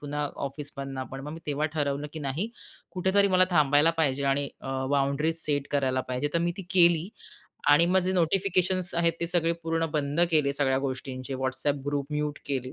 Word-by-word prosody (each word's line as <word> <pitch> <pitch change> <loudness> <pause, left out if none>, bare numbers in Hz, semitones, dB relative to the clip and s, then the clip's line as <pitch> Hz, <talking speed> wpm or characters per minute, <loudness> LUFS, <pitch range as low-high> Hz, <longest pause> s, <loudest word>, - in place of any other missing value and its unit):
पुन्हा 145 0 -3 0.2
ऑफिसमधनं 140 -1 -6
पण 135 - -5
मग 150 +2 -7
मी 165 - -8
तेव्हा 150 +1 0
ठरवलं, 145 -1 -1
की 160 - -6
नाही 150 - -2 0.4
कुठेतरी 190 +3 +2
मला 185 - +6
थांबायला 150 -1 +4
पाहिजे 140 -2 +1
आणि 140 0 -1
अ, - - -10 0.2
बाउंडरीज 145 +4 +1
सेट 145 -2 -1
करायला 130 -2 +1
पाहिजे, 130 +3 -1
तर - - +4
मी - - -1
ती 195 - -6
केली 170 -1 +5 0.6
आणि 150 +4 +6
मग 190 - +5
जे 185 - +1
नोटिफिकेशन्स 185 +1 +1
आहेत 170 0 +2
ते 170 - 0
सगळे 170 -1 +1
पूर्ण 165 0 0
बंद 145 +1 0
केले 150 -4 +3
सगळ्या 135 -2 +1
गोष्टींचे 130 -1 -4
WhatsApp 135 +2 -1
ग्रुप 145 -1 -1
म्यूट 150 0 -2
केले. 130 -2 -3
145 Hz, 185 wpm, -27 LUFS, 140-170 Hz, 0.6 s, मला